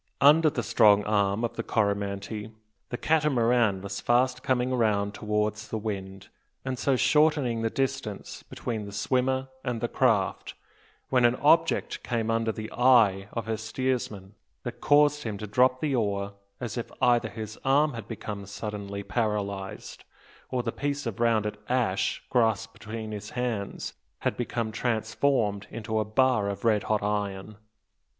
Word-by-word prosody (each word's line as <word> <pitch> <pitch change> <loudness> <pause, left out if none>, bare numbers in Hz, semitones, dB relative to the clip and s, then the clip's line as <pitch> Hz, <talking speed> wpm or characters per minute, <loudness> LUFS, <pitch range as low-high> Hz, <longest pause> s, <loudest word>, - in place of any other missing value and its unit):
Under 155 +3 +6
the 120 -5 -3
strong 105 -3 +5
arm 100 +1 +1
of 120 - -2
the - - 0
Coromantee, 100 0 -1 0.4
the 120 - -3
Catamaran 120 -10 +2
was 100 0 -5
fast 125 +1 +2
coming 130 0 +1
round 105 -4 +1
towards 105 +1 -1
the 110 - -3
wind, 95 -2 -5 0.4
and 130 -2 -3
so 135 - +2
shortening 145 -4 +3
the 115 - +1
distance 135 -5 -3
between 110 -4 -5
the 100 - -8
swimmer 130 +3 0
and 125 -3 -2
the 120 - -1
craft, 115 -7 +1 0.5
when 125 -2 +3
an 120 +1 +5
object 165 +4 +2
came 115 -2 -1
under 115 0 +1
the 110 0 -7
eye 115 -6 +4
of 115 - -3
her 110 -1 -2
steersman 110 -4 -3 0.3
that - - -6
caused 150 0 +4
him 110 -5 -4
to 105 - -6
drop 125 +4 +3
the 150 -3 0
oar 100 -4 -1 0.3
as 120 -1 -4
if 115 - -6
either 120 -1 +3
his 110 -1 -7
arm 145 +2 +3
had 115 -3 -7
become 105 -3 -6
suddenly 100 -1 -5
paralysed, 100 -1 -3 0.5
or 125 -1 -1
the 115 - -1
piece 145 +2 -3
of 115 -3 -4
rounded 110 -3 +1
ash 120 -7 0
grasped 110 -2 +1
between 110 0 -7
his 105 0 -6
hands 115 -5 -3 0.3
had - - 0
become 120 -2 -2
transformed 110 -2 0
into 110 -1 -3
a 110 - 0
bar 110 -1 +2
of 100 +3 -5
red 110 -3 +4
hot 105 -1 0
iron! 105 0 -2
110 Hz, 155 wpm, -27 LUFS, 105-125 Hz, 0.5 s, Under